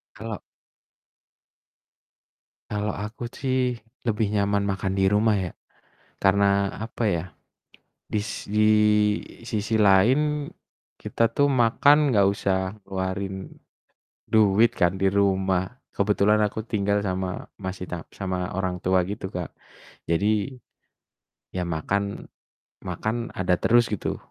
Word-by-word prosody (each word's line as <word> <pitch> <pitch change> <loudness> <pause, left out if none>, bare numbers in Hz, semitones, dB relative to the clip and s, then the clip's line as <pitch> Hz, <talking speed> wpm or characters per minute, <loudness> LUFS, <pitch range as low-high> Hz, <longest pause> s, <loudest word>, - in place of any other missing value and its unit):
Kalau 110 +1 -6 2.3
kalau 105 0 -2
aku 105 +4 -6
sih 130 -2 -1 0.3
lebih 105 -2 +1
nyaman 100 -1 +1
makan 95 -1 -1
di 95 0 +2
rumah 105 +1 +3
ya. 90 -3 -3 0.7
Karena, 100 0 +3
apa 115 +2 -5
ya, 85 -4 0 0.8
dis 105 -2 -3
di 105 +1 +3 0.7
sisi 110 -1 -1
lain, 135 +10 +3 0.5
kita 115 -1 0
tuh 145 0 +3
makan 140 +4 +4
nggak 100 -2 +4
usah 95 0 -1
keluarin 95 0 -3 0.9
duit 110 +1 +4
kan, 90 +1 +2
di 95 - +3
rumah. 95 -2 +1 0.3
Kebetulan, 105 +1 +2
aku 110 +1 -4
tinggal 100 -1 +1
sama, 95 -1 -3
masih 95 -1 -5
ta 85 -2 -5
sama 90 -2 -3
orang 95 -2 -1
tua 95 0 +3
gitu 100 -1 -5
Kak. 90 -2 -5 0.6
Jadi, 105 +8 +1 1.0
ya 90 -1 -2
makan 100 +5 -2 0.5
makan 115 +2 -3
ada 90 -1 +2
terus 120 0 +4
gitu, 105 - -2
100 Hz, 110 wpm, -25 LUFS, 95-110 Hz, 2.3 s, makan